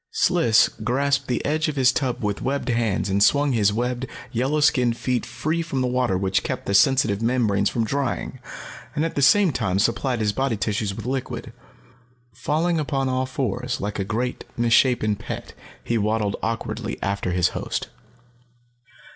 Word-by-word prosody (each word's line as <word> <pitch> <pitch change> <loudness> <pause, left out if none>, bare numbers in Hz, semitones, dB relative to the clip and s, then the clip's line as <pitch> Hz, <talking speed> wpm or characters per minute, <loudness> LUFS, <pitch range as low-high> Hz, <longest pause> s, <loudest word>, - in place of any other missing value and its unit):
Sliss 115 -1 +3
grasped 135 +5 -1
the 125 - -1
edge 155 +2 +1
of 155 - -2
his 130 -2 +4
tub 130 -4 -2
with 105 -1 -2
webbed 135 -1 -2
hands 115 -5 0
and 100 +1 0
swung 145 +6 +4
his 105 -4 +3
webbed, 125 +3 -2 0.2
yellow 135 +6 0
skinned 125 -5 +3
feet 125 -1 -1
free 155 +8 -2
from 150 -6 -2
the 125 - +1
water 125 -6 +1
which 95 0 +1
kept - - -4
the 100 - -1
sensitive 105 -1 +3
membranes 115 -5 +1
from 115 -2 -1
drying, 140 +2 -2 0.6
and 150 - +1
at 165 - -3
the 140 - -1
same 190 +6 +5
time 95 -8 -1
supplied 120 +4 +1
his 105 -1 0
body 130 -3 0
tissues 105 -1 -2
with - - -7
liquid. 125 -3 -4 0.8
Falling 160 +7 0
upon 135 -3 -1
all 130 0 0
fours, 130 -6 -2
like 105 +2 -4
a - - +1
great, 120 +5 -3
misshapen 120 -2 +3
pet, - - -7 0.3
he 115 -1 0
waddled 105 -1 0
awkwardly 115 0 -3
after 100 -1 -1
his 90 -1 +2
host. - - -4
120 Hz, 170 wpm, -23 LUFS, 105-135 Hz, 0.8 s, same